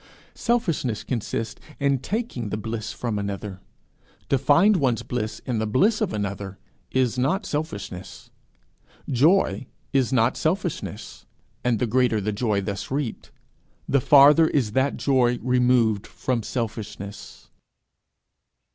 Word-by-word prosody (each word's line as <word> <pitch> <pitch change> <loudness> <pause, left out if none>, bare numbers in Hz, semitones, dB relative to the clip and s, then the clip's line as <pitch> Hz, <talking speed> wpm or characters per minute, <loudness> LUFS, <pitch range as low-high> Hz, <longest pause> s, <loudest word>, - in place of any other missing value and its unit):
Selfishness 170 - -1
consists 115 -2 -3 0.2
in 140 -2 +2
taking 195 - -3
the 105 - -2
bliss 110 0 -4
from 115 -4 -3
another; 100 -1 -5 0.7
to 135 - +3
find 170 - +5
one's 130 -7 +1
bliss 110 -3 -4
in 120 -4 -1
the 110 - -1
bliss 205 - +2
of 215 - 0
another 100 -2 -4 0.3
is 125 -1 +1
not 190 - +1
selfishness. 105 - -5 0.8
Joy 145 +1 +2 0.3
is 135 -2 +2
not 125 -1 +3
selfishness; 175 +1 -3 0.4
and 120 -2 +2
the 125 - 0
greater 120 -1 +2
the 105 +1 -1
joy 105 -1 0
thus 100 0 -4
reaped, 135 -3 -3 0.6
the 140 - +2
farther 145 +5 +7
is 125 -10 0
that 130 +4 +1
joy 125 -3 +2
removed 125 -4 +2
from 125 -3 -2
selfishness. 105 -3 -6
125 Hz, 125 wpm, -24 LUFS, 110-140 Hz, 0.8 s, farther